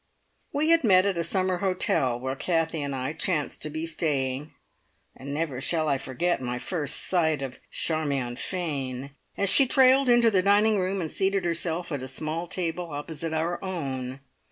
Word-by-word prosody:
We 300 +2 +1
had 330 -2 +5
met 190 -4 +5
at 195 -4 0
a - - +1
summer 185 +1 0
hotel 175 -10 +1
where 130 +1 -3
Kathie 165 0 0
and 140 -1 -3
I 130 +3 -3
chanced 160 -2 -2
to 155 - -2
be 155 +2 -4
staying, 145 -3 -2 0.6
and 140 +2 -8
never 145 -3 -2
shall 160 +2 0
I 140 -2 +1
forget 135 +6 -1
my 125 -1 -3
first 150 0 -2
sight 160 -6 +1
of 130 -2 -6
Charmion 140 -6 -1
Fane 140 -6 -4 0.3
as 200 - +1
she 275 - +6
trailed 265 +1 +5
into 240 -1 +5
the 190 -3 +3
dining 205 +2 +4
room 190 +1 -1
and 160 - -4
seated 195 0 0
herself 170 0 -2
at 145 -3 -2
a 130 - -5
small 155 +6 -3
table 170 -1 -3
opposite 155 +2 -4
our 165 +3 -2
own. 135 -8 -4
160 Hz, 180 wpm, -26 LUFS, 140-185 Hz, 0.6 s, she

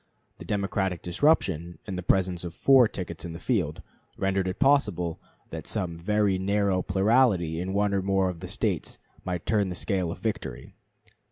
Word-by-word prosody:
The - - -9
Democratic 95 -3 -1
disruption, 90 - +1
and 95 - -5
the 90 - -3
presence 90 -1 +1
of 85 -1 -6
four 135 -3 +6
tickets 90 -5 -6
in 85 - -6
the 85 - -8
field, 90 - -1 0.3
rendered 95 -1 0
it 90 - -3
possible 110 - +2 0.3
that - - -7
some 85 -3 -3
very 100 +1 +1
narrow 100 -1 +1
plurality 95 -4 +2
in 95 +1 -3
one 100 0 +1
or 100 - +1
more 95 0 +1
of 90 -2 -4
the - - -7
States - - -2 0.3
might 90 -2 -4
turn 105 -3 +1
the 90 - -4
scale 95 -3 -1
of - - -6
victory. 85 - -4
95 Hz, 175 wpm, -27 LUFS, 85-105 Hz, 0.3 s, four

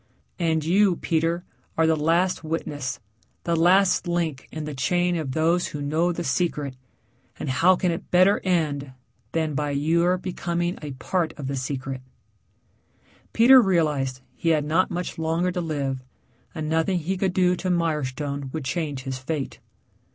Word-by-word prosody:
And 160 -3 +1
you, 190 +2 +4
Peter, 165 +1 0 0.3
are 160 - +4
the 160 0 +3
last 165 +4 +1
witness, 150 -4 -3 0.4
the 170 - 0
last 180 +2 +4
link 165 -6 -2
in 155 -1 -5
the 150 - -5
chain 175 +6 +1
of 150 -6 -3
those 165 +3 +2
who 150 - -6
know 160 +5 +1
the 175 0 -4
secret, 145 -3 -1 0.6
and - - -5
how 170 +8 +4
can 180 0 0
it 165 +3 -5
better 185 +3 +5
end 150 -7 0 0.4
than 160 -2 0
by 145 +1 -1
your 165 +5 +2
becoming 175 -1 -2
a 145 -3 -6
part 160 +5 -1
of 145 - -6
the 135 +1 -2
secret?" 135 0 -4 1.3
Peter 255 +3 +7
realized 150 - +1
that 130 - -19
he 165 - -1
had 155 -2 +2
not 165 +5 +2
much 175 -1 -4
longer 165 +3 0
to 180 0 -2
live 140 -5 -2 0.5
and 155 -2 -3
nothing 160 +4 +1
he 175 +3 -2
could 190 -1 0
do 180 -1 +3
to 185 - -3
Mirestone 145 -5 -1
would 155 -2 -4
change 145 -2 -2
his 130 -1 -4
fate. 140 +1 -4
160 Hz, 165 wpm, -24 LUFS, 145-175 Hz, 1.3 s, Peter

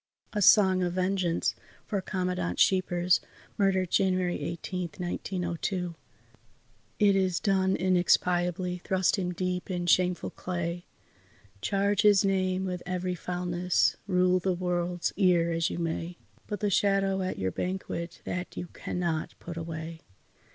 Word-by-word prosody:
A 210 - -1
SONG 190 -2 +6
OF 175 -1 0
VENGEANCE 185 -2 0 0.3
FOR 200 -2 -2
COMMANDANT 180 - -2
SCHEEPERS 180 -1 +3 0.4
(Murdered 190 -3 +2
January 185 -2 +1
18, 175 +1 -4
1902) 180 0 -3 1.0
It 205 -2 +4
is 185 -2 +1
done 190 -1 +2
inexpiably; 180 0 +1
thrust 190 +1 +2
him 180 -1 -1
deep 180 +1 -3
in 175 -1 -2
shameful 180 0 +2
clay, 175 -1 -4 0.8
Charge 200 0 +1
his 205 -1 +5
name 190 -1 +1
with 180 -1 -3
every 180 0 -2
foulness, 180 0 0
rule 185 -1 +3
the 185 0 0
world's 175 -1 -1
ear 175 -4 +3
as 165 0 +1
you - - -4
may 170 +1 -3 0.3
But 205 -3 -4
the 205 -1 +1
shadow 195 -1 +2
at 185 - -2
your 95 0 -1
banquet 180 - -4
that 180 0 -5
you 175 - -5
cannot 170 -3 -3
put 170 - -7
away! 165 0 -6
180 Hz, 130 wpm, -28 LUFS, 175-190 Hz, 1.0 s, SONG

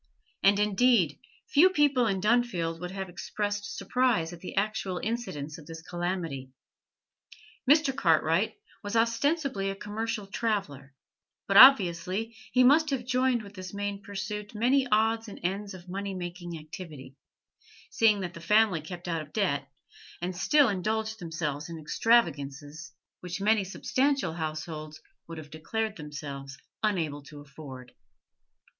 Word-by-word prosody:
And, 200 +1 +5
indeed, 210 - +3 0.3
few 340 +6 +7
people 285 -8 +3
in 195 -3 0
Dunfield 200 -7 +1
would 180 +1 -5
have 190 0 -5
expressed 205 +3 -4
surprise 235 -10 +1
at 175 - -10
the 180 - -8
actual 195 -2 -1
incidence 165 -10 -4
of 150 - -14
this 160 0 -9
calamity. 175 -7 -3 1.2
Mr. 290 -2 +5
Cartwright 165 - +2 0.3
was 205 +1 -5
ostensibly 230 -1 +1
a 195 - -3
commercial 210 +1 -4
traveller, 195 - -3 0.5
but 195 - 0
obviously 200 -2 +6 0.2
he 255 - +5
must 300 +4 +5
have 265 -4 -2
joined 250 -1 +1
with 200 -1 -12
this 185 0 -8
main 200 0 -3
pursuit 210 +1 -6
many 255 +5 +3
odds 225 +1 +2
and 205 - -9
ends 195 +2 -2
of 180 -1 -13
money 195 +1 -4
making 175 -1 -6
activity, 155 -4 -10 0.8
seeing 215 -3 +3
that 180 -2 -4
the 170 - -10
family 210 -2 +3
kept 175 +3 -8
out 165 -2 -1
of 150 -1 -11
debt, 145 -10 -1 0.5
and 180 +1 -3
still 290 +8 +4
indulged 220 +2 -1
themselves 160 -3 -4
in 165 - -6
extravagances 155 - 0 0.3
which 180 +1 -5
many 210 +1 +3
substantial 260 - 0
households 155 -1 -5 0.3
would 165 0 -8
have 150 -1 -10
declared 215 +7 -3
themselves 140 -4 -7 0.2
unable 165 -9 0
to 145 +1 -12
afford. 140 -4 -11
195 Hz, 140 wpm, -28 LUFS, 160-225 Hz, 1.2 s, few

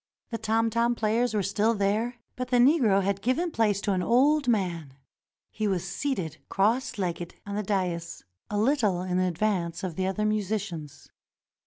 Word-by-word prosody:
The 230 - -3
tom 225 +1 +1
tom 235 +2 +2
players 225 +1 +1
were 205 - +1
still 210 +4 +1
there, 215 +4 0 0.2
but 255 0 -4
the 250 - +2
Negro 240 -7 +4
had 200 0 -1
given 325 - 0
place 210 -7 +1
to 205 - 0
an 185 - 0
old 275 +7 +3
man. 175 - -1 0.6
He 215 -1 -2
was 190 -2 -1
seated 185 - -3
cross 225 +8 +1
legged 175 -3 -3
on 200 - -5
the 210 - 0
dais, 185 -4 -2 0.3
a 210 - -2
little 215 -6 +2
in 185 0 -1
advance 180 -1 -1
of 180 -4 -4
the 185 0 0
other 210 +3 -1
musicians. 200 -8 -3
210 Hz, 170 wpm, -27 LUFS, 185-230 Hz, 0.6 s, Negro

